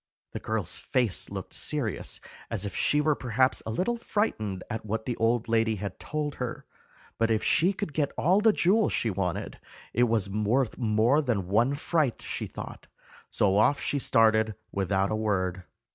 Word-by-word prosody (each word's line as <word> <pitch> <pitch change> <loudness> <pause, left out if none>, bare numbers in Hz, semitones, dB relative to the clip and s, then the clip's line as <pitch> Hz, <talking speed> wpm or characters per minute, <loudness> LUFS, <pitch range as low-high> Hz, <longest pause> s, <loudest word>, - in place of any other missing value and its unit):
The - - -5
girl's - - -3
face 120 -7 0
looked 95 -1 -7
serious, 135 -10 -2 0.3
as - - -1
if 100 - -5
she 150 - +2
were 155 0 +3
perhaps 130 -1 +1
a - - -2
little 185 - 0
frightened 110 - -2
at 110 - -4
what 110 +1 -3
the 120 - -2
old 115 +1 +1
lady 115 -1 +2
had 100 -2 -6
told 150 -1 -3
her; 125 -1 -4 0.5
but 115 0 +2
if 110 -1 +1
she 170 +6 +3
could 200 -5 -5
get 145 -2 0
all 185 +6 +3
the 220 0 +6
jewels 210 +3 +2
she 115 - 0
wanted, 95 +1 -3 0.3
it 120 +2 +4
was 110 -4 +1
worth 110 +5 0
more 115 +5 +3
than 110 -10 -1
one 115 +8 +2
fright, 150 -3 0
she - - -4
thought; - - -9 0.4
so 100 0 +2
off 140 +6 +4
she 145 - -1
started 110 -3 +3 0.2
without 95 0 0
a - - +1
word. 95 -4 -1
115 Hz, 175 wpm, -28 LUFS, 105-145 Hz, 0.5 s, the